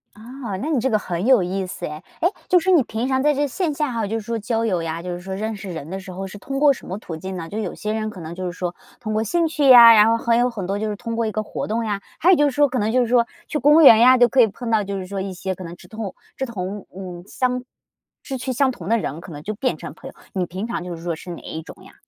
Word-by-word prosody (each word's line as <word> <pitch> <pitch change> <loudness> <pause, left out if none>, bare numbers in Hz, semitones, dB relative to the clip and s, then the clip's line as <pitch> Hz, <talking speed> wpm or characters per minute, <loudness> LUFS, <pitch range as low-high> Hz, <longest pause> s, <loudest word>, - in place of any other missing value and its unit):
啊， 230 -1 -7
那 285 +11 -3
你 300 -5 +2
这 260 +3 0
个 215 -3 +2
很 180 -1 -3
有 255 -4 +5
意 185 +2 -2
思 180 -1 -6
哎， 150 - -5 0.2
诶， 350 - +3 0.2
就 360 - +6
是 375 +3 +1
你 335 -7 +5
平 225 +2 -3
常 260 0 +1
在 300 0 +4
这 290 +1 0
线 325 +3 -2
下 295 -1 -1
哈 225 -2 -1
就 220 +3 -2
是 210 - -11
说 230 0 -2
交 225 +1 -1
友 185 -6 0
呀， 165 0 -3
就 180 +1 -5
是 175 0 -5
说 190 +1 -6
认 215 +3 -3
识 195 -2 -7
人 160 -3 -7
的 190 +2 -4
时 190 -1 -10
候 190 +2 -5
是 195 - -10
通 275 +7 -4
过 290 -1 +6
什 - - -12
么 190 - -5
途 175 -6 -7
径 190 +3 -6
呢， 165 -2 -6
就 205 +6 -5
有 215 - -3
些 215 0 -3
人 215 0 -2
可 205 - -10
能 165 0 -7
就 185 +1 -5
是 180 - -2
说 175 0 -4 0.2
通 215 -3 -4
过 215 +1 +1
兴 335 +9 +1
趣 300 -3 +2
呀， 235 -2 +11
然 215 -1 +7
后 230 - +3
还 235 -1 +2
有 245 +1 +3
很 215 -6 -5
多 195 +1 -1
就 215 +1 -2
是 210 - -3
通 230 +2 -5
过 230 0 0
一 215 - -1
个 215 - -1
活 - - -5
动 225 +2 -1
呀， 205 -2 -2 0.2
还 345 - +4
有 - - +7
就 295 - +3
是 - - -4
说 290 +2 +3
可 260 -1 -3
能 215 -1 0
就 255 +2 +3
是 240 - +1
说 235 0 +4 0.2
去 - - -2
公 295 +4 +6
园 225 -6 +9
呀 255 +2 +7
就 245 -1 +6
可 255 +2 +4
以 230 - +6
碰 230 +3 -7
到 220 -2 +2
就 200 0 -4
是 185 -1 -6
说 195 0 -4
一 190 0 -4
些 185 +1 -4
可 185 - -9
能 170 0 -8
志 - - -16
同 215 -4 -6 0.2
志 265 - -2
同 200 -3 -5
嗯 180 -2 -8
相 250 +3 -1 0.6
志 270 - -5
趣 260 +1 -3
相 265 +2 +2
同 185 -7 -8
的 230 - +4
人 165 -7 -4
可 175 - -11
能 145 -1 -8
就 215 - -3
变 255 +4 -1
成 - - -8
朋 - - -11
友， - - -14 0.2
你 185 -2 0
平 185 +5 -5
常 235 - -3
就 180 -1 -6
是 165 - -12
说 170 -1 -2
是 175 - -11
哪 170 - -8
一 160 - -6
种 - - -13
呀？ - - -15
215 Hz, 350 characters per minute, -22 LUFS, 185-250 Hz, 0.6 s, 呀